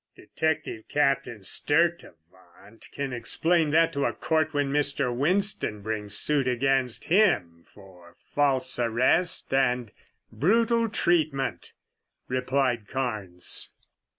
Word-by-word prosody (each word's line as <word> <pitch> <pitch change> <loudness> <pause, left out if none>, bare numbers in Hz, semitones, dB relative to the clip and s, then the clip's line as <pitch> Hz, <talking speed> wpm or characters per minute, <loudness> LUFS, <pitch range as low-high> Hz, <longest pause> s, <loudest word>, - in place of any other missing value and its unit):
"Detective 160 -8 -3
Captain 135 -7 0
Sturtevant 100 - -3
can 140 -2 -4
explain 160 +7 +1
that 165 +2 +3
to 140 -2 -1
a - - 0
court 155 -1 0
when 145 -2 -1
Mr. 140 -4 0
Winston 155 - 0
brings 105 -1 0
suit 145 -3 +2
against 130 -1 0
him 125 - +1
for 90 -4 -17 0.2
false 135 -3 +1
arrest 125 +9 +1
and 125 -4 +1 0.4
brutal 230 - +2
treatment," 155 -9 -1 0.5
replied 130 -3 -1
Carnes. 105 -9 -2
135 Hz, 100 wpm, -26 LUFS, 110-155 Hz, 0.5 s, that